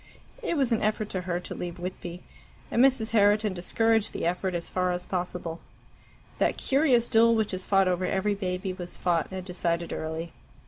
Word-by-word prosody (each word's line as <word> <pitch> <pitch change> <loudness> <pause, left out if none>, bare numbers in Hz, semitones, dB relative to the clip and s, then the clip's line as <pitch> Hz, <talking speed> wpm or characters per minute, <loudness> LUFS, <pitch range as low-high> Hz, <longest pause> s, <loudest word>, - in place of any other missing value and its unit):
It 335 - -1
was 265 -4 +2
an 225 - +2
effort 215 0 0
to 185 - -2
her 175 0 0
to - - -7
leave 175 -1 -5
Whitby, 180 0 -6 0.5
and 240 - +4
Mrs. 260 -5 +3
Herriton 210 -1 +4
discouraged 225 +4 +1
the - - -3
effort 180 +1 -1
as 170 - -3
far 180 0 0
as 180 0 -4
possible. 175 -2 -3 0.8
That - - +2
curious 265 -4 +3
duel 230 +1 +5
which 220 -3 0
is 185 0 -3
fought 195 -1 +4
over 185 0 +1
every 195 +3 +1
baby 185 -1 -3
was 175 -1 -7
fought 170 -3 +1
and 185 -1 -6
decided 170 -2 -2
early. 160 +1 -4
185 Hz, 185 wpm, -27 LUFS, 175-220 Hz, 0.8 s, duel